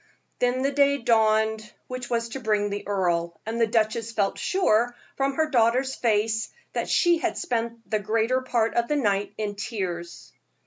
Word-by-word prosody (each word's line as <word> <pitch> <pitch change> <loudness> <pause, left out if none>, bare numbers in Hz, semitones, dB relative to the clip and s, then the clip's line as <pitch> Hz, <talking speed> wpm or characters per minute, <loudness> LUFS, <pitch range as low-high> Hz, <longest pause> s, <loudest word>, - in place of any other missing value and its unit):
Then 250 +1 +1
the 275 - +1
day 280 0 +3
dawned 220 -2 +2
which 255 -1 -6
was 235 -1 -1
to 270 - -5
bring 210 -3 0
the 205 0 -5
earl, 170 -4 0
and 230 +2 -2
the 230 - +4
duchess 225 0 0
felt 200 -3 0
sure, 245 - +2 0.2
from 275 0 0
her 315 +1 +2
daughter's 250 +2 +3
face, 220 -2 0 0.2
that - - -2
she 345 -2 +3
had 350 - -1
spent 230 -1 -3
the 215 - 0
greater 225 +5 +1
part 235 -3 0
of 235 0 +1
the 300 - 0
night 205 -7 +1
in 210 -1 -2
tears. 185 -5 -5
225 Hz, 175 wpm, -25 LUFS, 210-255 Hz, 0.2 s, the